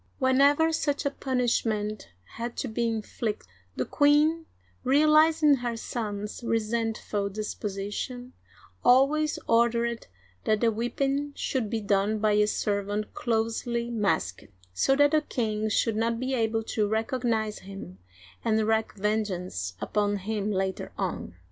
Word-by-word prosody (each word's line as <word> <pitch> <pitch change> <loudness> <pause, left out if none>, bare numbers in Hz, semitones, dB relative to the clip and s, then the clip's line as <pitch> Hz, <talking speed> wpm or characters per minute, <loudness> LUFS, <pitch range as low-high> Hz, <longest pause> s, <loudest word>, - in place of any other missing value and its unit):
*' - - -39
Whenever 280 +4 +4
such 290 -2 -1
a 280 - +1
punishment 230 -6 -1 0.3
had 235 +1 -4
to - - -2
be 235 +1 -1
inflicted, 220 - -3 0.3
the 130 - -1
queen 300 +3 +3 0.2
— 90 0 -36
realizing 305 +1 +5
her 240 -2 -3
son's 210 -1 -4
resentful 225 -2 -1
disposition 210 +4 -5 0.2
— - - -26
always 280 +5 +4
ordered 235 0 +2 0.4
that 215 -1 +2
the 230 -1 +4
whipping 275 +5 -1
should 250 -6 -2
be 225 - -1
done 205 +1 +1
by 215 0 +2
a 210 0 +4
serv 200 -1 -1
ant 210 +1 -3
closely 235 +1 -1
masked, 195 - -1 0.3
so 270 - +3
that 290 +1 +4
the 310 - +4
king 220 -6 -2
should 220 +1 +1
not 230 +1 0
be 255 +1 -2
able 225 -2 0
to 215 -1 0
recognize 220 0 -1
him 190 - -10 0.4
and 220 -1 +2
wreak 220 0 +1
vengeance 185 - -2
upon 205 -1 0
him 210 +1 -2
later 190 -1 -2
on. - - -3
225 Hz, 140 wpm, -27 LUFS, 210-255 Hz, 0.4 s, realizing